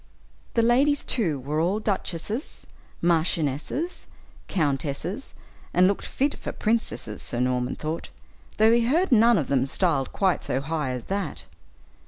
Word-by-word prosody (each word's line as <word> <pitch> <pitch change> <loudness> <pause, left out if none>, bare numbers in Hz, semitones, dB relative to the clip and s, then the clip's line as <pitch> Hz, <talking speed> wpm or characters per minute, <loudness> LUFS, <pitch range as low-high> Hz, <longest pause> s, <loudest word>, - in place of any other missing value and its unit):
The 230 - +4
ladies, 275 +5 +3
too, 175 - 0
were 145 +4 -2
all 180 +6 +1
duchesses, 210 - -3 0.4
marchionesses, 165 - 0 0.4
countesses, 155 - -2 0.4
and 180 - +6
looked 200 +1 +1
fit 280 +2 -1
for - - -4
princesses, 220 - -1
Sir 120 - -3
Norman 125 0 0
thought, 155 +2 -4 0.5
though 220 +1 +6
he 235 0 +4
heard 330 +6 +2
none 235 -1 +6
of 150 - 0
them 135 -1 +1
styled 145 -4 +1
quite 190 -3 +1
so 130 - -1
high 150 0 -2
as 125 -2 -4
that. 195 -4 -3
175 Hz, 140 wpm, -25 LUFS, 140-230 Hz, 0.5 s, and